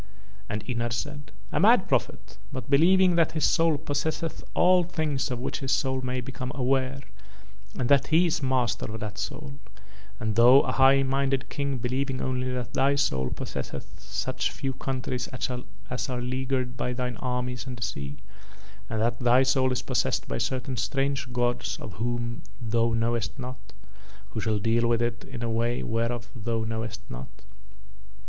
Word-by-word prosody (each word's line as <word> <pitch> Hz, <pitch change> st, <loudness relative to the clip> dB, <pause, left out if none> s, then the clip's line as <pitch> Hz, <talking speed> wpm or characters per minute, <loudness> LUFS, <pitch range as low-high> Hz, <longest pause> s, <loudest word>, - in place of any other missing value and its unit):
And 105 Hz, 0 st, -3 dB
Ynar 120 Hz, -2 st, -1 dB
said: 145 Hz, +5 st, -4 dB, 0.2 s
"A -, -, +1 dB
mad -, -, +6 dB
prophet, -, -, -1 dB
but 130 Hz, 0 st, -6 dB
believing 180 Hz, +4 st, +5 dB
that 165 Hz, -, +3 dB
his 155 Hz, -, +2 dB
soul 165 Hz, -3 st, +3 dB
possesseth 155 Hz, +2 st, -2 dB
all 180 Hz, 0 st, +5 dB
things 155 Hz, -5 st, -1 dB
of 125 Hz, -, -2 dB
which 125 Hz, -, -3 dB
his 135 Hz, -1 st, -2 dB
soul 130 Hz, -1 st, +1 dB
may 125 Hz, 0 st, -2 dB
become 130 Hz, +1 st, -5 dB
aware 135 Hz, 0 st, +1 dB, 0.8 s
and 125 Hz, -, 0 dB
that 140 Hz, 0 st, +4 dB
he 165 Hz, +3 st, +5 dB
is 165 Hz, -, 0 dB
master 130 Hz, -5 st, 0 dB
of 110 Hz, -, -5 dB
that 105 Hz, 0 st, -5 dB
soul, 140 Hz, +4 st, -5 dB, 0.6 s
and 110 Hz, -3 st, -1 dB
thou 125 Hz, +4 st, +8 dB
a -, -, -1 dB
high 135 Hz, +1 st, +6 dB
minded 135 Hz, 0 st, 0 dB
King 140 Hz, -2 st, -1 dB
believing 130 Hz, +2 st, -1 dB
only 130 Hz, 0 st, -1 dB
that 125 Hz, -3 st, -4 dB
thy 140 Hz, +1 st, +3 dB
soul 65 Hz, -, +1 dB
possesseth -, -, -6 dB
such 95 Hz, +7 st, -2 dB
few 135 Hz, -2 st, -3 dB
countries 130 Hz, -1 st, -3 dB
as 125 Hz, -2 st, -5 dB
are 125 Hz, -1 st, -2 dB
leaguered 130 Hz, 0 st, -1 dB
by 125 Hz, 0 st, -2 dB
thine 125 Hz, -2 st, -3 dB
armies 125 Hz, -2 st, -3 dB
and 125 Hz, -1 st, -5 dB
the 115 Hz, -, -4 dB
sea, 70 Hz, -9 st, -4 dB, 0.7 s
and 110 Hz, -1 st, -1 dB
that 120 Hz, +1 st, +1 dB
thy 125 Hz, +1 st, +5 dB
soul 130 Hz, 0 st, +3 dB
is 125 Hz, -, -1 dB
possessed -, -, 0 dB
by 60 Hz, -, -2 dB
certain 130 Hz, 0 st, -2 dB
strange 135 Hz, +4 st, -1 dB
gods 120 Hz, 0 st, 0 dB
of 105 Hz, -, -7 dB
whom 120 Hz, 0 st, -2 dB, 0.2 s
thou 115 Hz, -1 st, +1 dB
knowest 115 Hz, +1 st, 0 dB
not, 125 Hz, -6 st, -8 dB, 0.6 s
who 110 Hz, -, -3 dB
shall 110 Hz, 0 st, +1 dB
deal 115 Hz, +3 st, +2 dB
with 115 Hz, -1 st, +2 dB
it 115 Hz, 0 st, -2 dB
in 120 Hz, -, -6 dB
a 115 Hz, -, -1 dB
way 120 Hz, +2 st, 0 dB
whereof 115 Hz, +1 st, -2 dB
thou 115 Hz, -1 st, -1 dB
knowest 110 Hz, -1 st, -4 dB
not. -, -, -7 dB
125 Hz, 170 wpm, -27 LUFS, 115-135 Hz, 0.8 s, thou